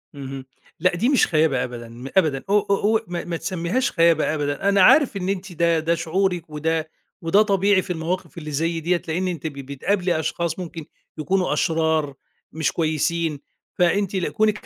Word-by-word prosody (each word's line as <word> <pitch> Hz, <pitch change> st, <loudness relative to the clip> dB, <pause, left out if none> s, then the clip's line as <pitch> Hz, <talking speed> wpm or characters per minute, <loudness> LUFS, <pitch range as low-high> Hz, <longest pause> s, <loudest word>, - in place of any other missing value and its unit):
اهم. 135 Hz, -1 st, -7 dB, 0.3 s
لأ، 185 Hz, -1 st, +2 dB
دي 230 Hz, +8 st, +1 dB
مش 280 Hz, -, +4 dB
خيابة 155 Hz, -6 st, +2 dB
أبدًا، 120 Hz, -2 st, -7 dB
م 120 Hz, +3 st, -9 dB
أبدًا. 150 Hz, -7 st, +2 dB
أو 205 Hz, +1 st, +5 dB
أو 200 Hz, 0 st, +1 dB
أوع 220 Hz, +1 st, +3 dB
ما 175 Hz, -1 st, -4 dB
ما 170 Hz, -1 st, -3 dB
تسميهاش 170 Hz, +8 st, -1 dB
خيابة 165 Hz, -3 st, +3 dB
أبدًا. 145 Hz, +5 st, -1 dB
أنا 200 Hz, -1 st, +4 dB
عارف 275 Hz, +2 st, +5 dB
إن 185 Hz, 0 st, -3 dB
أنتِ 195 Hz, 0 st, -3 dB
ده 170 Hz, 0 st, +2 dB
ده 165 Hz, +2 st, +1 dB
شعورِك 175 Hz, 0 st, -1 dB
وده 160 Hz, +1 st, -2 dB, 0.3 s
وده 170 Hz, +5 st, +4 dB
طبيعي 200 Hz, -2 st, +3 dB
في 180 Hz, -, -4 dB
المواقف 170 Hz, +2 st, -4 dB
اللي 155 Hz, -2 st, -6 dB
زي 165 Hz, +3 st, -1 dB
ديّة 175 Hz, +2 st, 0 dB
لأن 175 Hz, +4 st, -1 dB
أنتِ 165 Hz, -4 st, -3 dB
ب 155 Hz, -, -6 dB
بتقابلي 155 Hz, +6 st, -1 dB
أشخاص 165 Hz, +2 st, -2 dB
ممكن 165 Hz, -3 st, -7 dB, 0.3 s
يكونوا 185 Hz, +4 st, 0 dB
أشرار، 160 Hz, -3 st, +1 dB, 0.4 s
مش 160 Hz, 0 st, -1 dB
كويسين. 160 Hz, -1 st, -1 dB, 0.4 s
فأنتِ 190 Hz, +3 st, +2 dB
لكونِك 210 Hz, +5 st, 0 dB
170 Hz, 175 wpm, -22 LUFS, 155-185 Hz, 0.4 s, أو